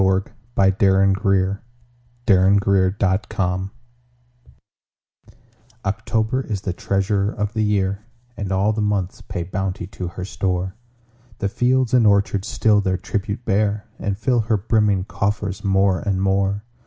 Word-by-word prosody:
Paul 95 0 +3 0.6
Laurence 95 0 +4 1.1
Dunbar 100 -1 +4 0.2
October 95 0 -1 2.1
OCTOBER 110 +4 0
is 105 -4 -3
the 95 -3 -3
treasurer 100 +2 0
of 105 +1 -3
the 110 - -1
year, 100 -1 0 0.3
And 100 -3 -4
all 100 +3 +2
the 110 - -2
months 100 -3 -1
pay 85 - -5
bounty 95 +1 -3
to 90 -1 -6
her 90 +2 -6
store: 95 -1 -2 0.6
The 100 - -1
fields 125 +2 +1
and 120 -3 +5
orchards 100 0 +2
still 105 -2 +3
their 95 -1 0
tribute 105 +3 -4
bear, 105 +1 +1
And 100 -1 -2
fill 120 +3 +1
her 110 -1 +1
brimming 105 -2 +1
coffers 100 0 -2
more 95 -2 +2
and 95 +4 -1
more. 100 +1 +1
100 Hz, 130 wpm, -21 LUFS, 95-105 Hz, 2.1 s, and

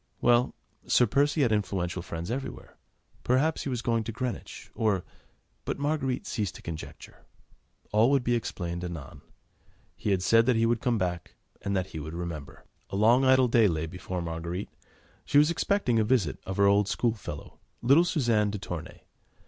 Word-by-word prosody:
Well! 120 +1 +3 0.3
Sir 125 - +5
Percy 145 +6 +2
had 120 - +2
influential 90 -4 -1
friends 85 +3 -5
everywhere. 135 +2 -6 0.5
Perhaps 140 +6 +1
he - - -1
was 125 -3 -3
going 115 -1 +1
to 115 - -3
Greenwich, 125 +1 -5
or... 105 -5 0 0.6
but - - -3
Marguerite 140 -3 -1
ceased 105 -4 -3
to - - -12
conjecture; 80 -2 -9 0.7
all 110 +4 +4
would 140 -2 +3
be 120 - +1
explained 85 -7 -3
anon: 85 -6 -7 0.7
he 100 -3 0
said 115 +5 +4
that 125 - +4
he 115 0 +3
would 115 0 +1
come 120 -3 +1
back, 90 -4 -3 0.3
and 100 0 -2
that 95 0 -3
he 80 - -4
would 80 +2 -6
remember. 85 -5 -6 0.2
A - - -5
long, 115 +6 +5
idle 130 -1 +5
day 115 -2 +5
lay 80 -3 -1
before 90 +1 -5
Marguerite. 85 +3 -4 0.5
She 145 - +1
was 150 +3 +6
expecting 170 - +1
the 110 - +4
visit 105 - +1
of 95 - -4
her 100 - +5
old 100 0 +4
school 115 +2 +1
fellow, 110 - -9 0.2
little 140 +8 +6
Suzanne 120 -11 +1
de 105 - -3
Tournay. 90 -2 -7
110 Hz, 175 wpm, -28 LUFS, 90-125 Hz, 0.7 s, was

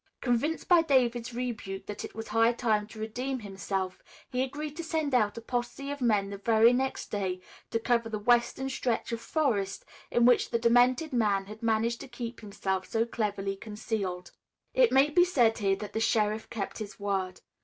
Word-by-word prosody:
Convinced 270 +6 0
by 350 -2 +6
David's 250 -6 +1
rebuke 230 -6 -4
that 210 0 -6
it - - -8
was 225 0 -6
high 225 +1 +4
time 220 -3 0
to 220 - -13
redeem 245 +4 -3
himself, 195 -2 -4 0.3
he 250 -1 0
agreed 290 +3 -4
to 335 - -4
send 315 -3 -1
out 210 -4 +2
a - - -5
posse 245 +4 -3
of 285 -1 -6
men 205 -5 +2
the 200 - -6
very 225 +3 +5
next 265 +1 -2
day 190 -3 -2 0.3
to - - 0
cover 235 0 +1
the 215 - -2
western 240 +4 +2
stretch 250 -3 -1
of 230 0 -3
forest 220 -11 -1 0.2
in 240 0 +3
which 245 0 +4
the 235 - +1
demented 245 +5 +3
man 205 -5 +2
had 215 +2 -10
managed 230 +1 +1
to 275 - -8
keep 240 -1 -6
himself 190 -3 -3
so 225 0 +1
cleverly 200 -4 -2
concealed. 200 -4 -4 0.4
It - - +4
may 275 +3 +5
be 350 +3 +6
said 240 -11 +3
here 195 -2 +2
that 210 +1 -8
the 220 - -1
sheriff 220 -1 +1
kept 205 -1 -4
his 215 -1 -7
word. 195 -2 -2
230 Hz, 190 wpm, -29 LUFS, 205-250 Hz, 0.4 s, by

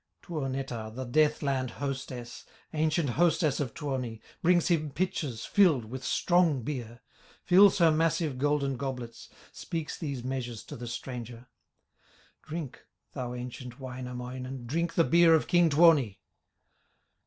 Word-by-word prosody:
Tuonetar, 135 -7 -4
the 130 +1 -4
death 150 +5 +2
land 130 -2 0
hostess, 130 -3 -5 0.3
Ancient 155 -2 +1
hostess 160 0 +2
of 135 -6 -3
Tuoni, 130 -6 -3 0.2
Brings 175 0 +3
him 155 -3 +1
pitchers 145 -7 -2
filled 170 - +4
with 125 +4 -7
strong 170 -4 +2
beer, 120 -4 -5 0.4
Fills 195 +2 +6
her 165 -3 +5
massive 155 -3 +1
golden 140 -2 +1
goblets, 125 -3 -6 0.2
Speaks 165 -2 -5
these 140 -7 -5
measures 125 -3 -4
to - - -9
the 120 0 -7
stranger: 120 0 -7 0.9
"Drink, 155 -4 -7 0.3
thou 125 -2 -4
ancient 125 +1 -7
Wainamoinen, 125 0 -6
Drink 165 +7 -1
the 165 - +5
beer 165 0 +6
of 160 - +1
king 175 -2 +4
Tuoni!" 145 - +5
135 Hz, 130 wpm, -29 LUFS, 125-160 Hz, 0.9 s, Fills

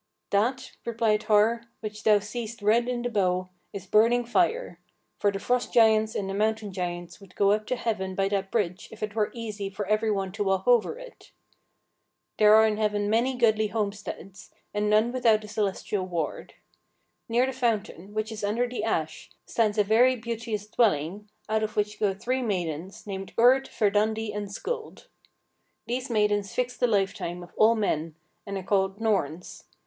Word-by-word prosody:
"That," 250 +6 0
replied 225 -2 +1
Har, 225 +2 +3 0.2
"which 215 -1 -6
thou 215 -1 +6
seest 220 +2 -6
red 230 +3 +3
in 245 -1 -2
the 245 - -1
bow, 185 -3 0 0.2
is 195 -2 -7
burning 230 +5 +3
fire; 365 - 0 0.4
for 205 - +2
the 195 - -4
Frost 245 +4 -1
giants 220 -1 +4
and 195 - -2
the 195 - -3
Mountain 215 0 -1
giants 175 +1 -5
would 190 -2 -16
go 200 0 +3
up 215 +1 0
to 255 - 0
heaven 195 -6 -2
by 195 0 +1
that 195 -1 -1
bridge 190 -4 -2
if 220 - -9
it 210 -1 -3
were 215 -1 0
easy 210 -4 -5
for 200 +1 -5
every 215 +2 +1
one 195 -2 -1
to 205 +2 -2
walk 190 0 0
over 245 - +3
it. - - -13 1.1
There 210 0 +7
are 220 0 +7
in 215 -1 +1
heaven 210 -1 0
many 245 +4 +2
goodly 220 -3 +3
homesteads, 200 -3 -5 0.2
and 210 0 0
none 215 +3 +3
without 230 -4 +3
a - - -9
celestial 205 -2 -2
ward. 170 -4 -4 0.7
Near 240 +2 +3
the 265 - -3
fountain, 215 -6 -2
which 215 +1 -2
is 215 -1 -7
under 225 +5 +1
the 240 -3 -4
ash, 160 -8 -2 0.2
stands 220 -2 0
a 210 - +5
very 235 +5 +4
beauteous 230 -2 -4
dwelling, 205 -2 0 0.2
out 220 0 +1
of 215 0 -3
which 210 0 -1
go 200 -2 +1
three 255 +6 -1
maidens, 185 -2 -3
named 195 -2 -6
Urd, 255 +3 +5
Verdandi, 215 +1 0
and 205 0 -4
Skuld. 460 - -6 0.8
These 255 +3 -3
maidens 210 -3 +1
fix 250 0 -1
the 245 - +2
lifetime 195 -4 -1
of 175 - -14
all 225 +2 +5
men, 165 -7 -1 0.3
and 200 0 -3
are 190 - -5
called 195 +1 0
Norns. 180 -7 -2
210 Hz, 180 wpm, -27 LUFS, 200-230 Hz, 1.1 s, There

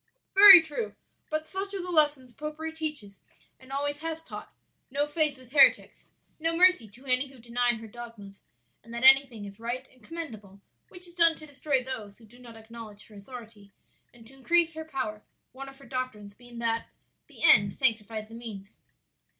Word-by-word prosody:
"Very 390 -3 +10
true; 325 +9 -5 0.3
but 310 0 -2
such 390 +3 -5
are 385 - -3
the 360 - -6
lessons 290 -6 +2
popery 305 +3 -6
teaches 300 -12 -5 0.4
and 260 0 -16
always 285 +1 -2
has 325 0 -5
taught; - - -10 0.4
'no 285 +2 0
faith 295 -2 -1
with 255 -2 -18
heretics,' 275 -2 +3 0.3
no 330 +1 -1
mercy 360 - +4
to 240 +7 -17
any 255 +1 +1
who 270 0 -17
deny 240 +1 0
her 225 0 -10
dogmas; 220 -3 -11 0.4
and 230 - -15
that 235 - -4
anything 265 -5 +5
is 200 +1 -11
right 245 +3 -4
and 255 -3 -24
commendable 220 - -7 0.3
which 360 0 -8
is 345 - -13
done 335 -2 +4
to 310 - -10
destroy 285 -2 -2
those 220 -6 -7
who 230 - -18
do 240 +3 -19
not 235 -2 -13
acknowledge 220 -2 -12
her 215 - -16
authority 215 -1 -12 0.4
and 235 -1 -18
to 245 - -16
increase 335 +5 +2
her 320 0 -7
power; 255 -8 -4 0.3
one 270 +1 -9
of 270 - -16
her 275 - -16
doctrines 255 -6 -5
being 240 +2 -15
that 230 -1 -1 0.4
the - - -12
end 215 -12 +6
sanctifies 220 -4 -1
the - - -14
means!" 215 -4 -9
255 Hz, 185 wpm, -27 LUFS, 225-310 Hz, 0.4 s, Very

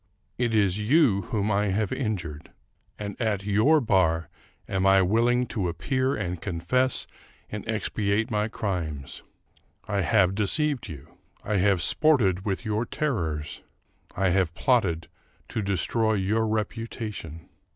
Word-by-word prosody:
It 120 -2 +1
is 100 -2 +2
you 115 -2 +3
whom 105 -1 0
I 105 +1 +2
have 100 +1 0
injured, 90 - -4 0.5
and 100 -1 -5
at 105 -4 0
your 110 +10 +4
bar 90 - +2 0.4
am 95 0 +1
I 95 0 +6
willing 120 +6 +2
to 95 -6 -1
appear 130 - -1
and 90 -4 -4
confess 100 +9 0 0.5
and 105 -1 -5
expiate 110 +1 -1
my 105 0 +1
crimes. 80 -10 -4 0.7
I 100 -2 0
have 95 -1 +3
de 105 +1 0
ceived 150 +4 0
you; 75 -3 -11 0.2
I 105 -1 0
have 95 -2 +2
sported 110 - +3
with 100 +4 -2
your 110 +1 0
terrors; 80 - -3 0.5
I 95 -1 +2
have 90 -2 +1
plotted 95 - +1 0.4
to 110 - -2
destroy 105 +3 0
your 105 +3 +1
reputation. 110 -6 -4
105 Hz, 135 wpm, -26 LUFS, 90-115 Hz, 0.7 s, I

